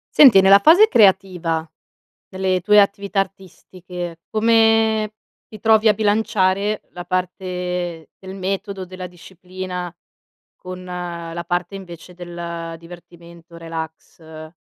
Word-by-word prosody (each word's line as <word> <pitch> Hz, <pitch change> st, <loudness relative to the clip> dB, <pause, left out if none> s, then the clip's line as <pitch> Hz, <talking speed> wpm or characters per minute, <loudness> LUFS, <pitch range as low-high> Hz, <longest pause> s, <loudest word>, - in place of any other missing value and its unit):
Senti, 250 Hz, -10 st, +8 dB
nella 195 Hz, +1 st, +7 dB
fase 340 Hz, -, +6 dB
creativa 180 Hz, -, +2 dB, 0.6 s
delle 185 Hz, -1 st, -1 dB
tue 210 Hz, +3 st, +5 dB
attività 200 Hz, 0 st, -1 dB
artistiche, 180 Hz, -2 st, -9 dB
come 225 Hz, -1 st, +2 dB, 0.3 s
ti 215 Hz, -, -12 dB
trovi 220 Hz, +1 st, +4 dB
a 215 Hz, -, +6 dB
bilanciare 210 Hz, -1 st, 0 dB
la 175 Hz, 0 st, -9 dB
parte 180 Hz, -3 st, -4 dB
del 190 Hz, 0 st, -9 dB
metodo, 195 Hz, 0 st, -4 dB
della 185 Hz, 0 st, -8 dB
disciplina, 180 Hz, 0 st, -8 dB, 0.6 s
con 185 Hz, 0 st, -9 dB
la 170 Hz, -2 st, -6 dB
parte 175 Hz, +1 st, -2 dB
invece 180 Hz, -2 st, -11 dB
del 170 Hz, -1 st, -7 dB
divertimento, 170 Hz, 0 st, -15 dB
relax? 160 Hz, -1 st, -9 dB
185 Hz, 105 wpm, -20 LUFS, 175-200 Hz, 0.6 s, Senti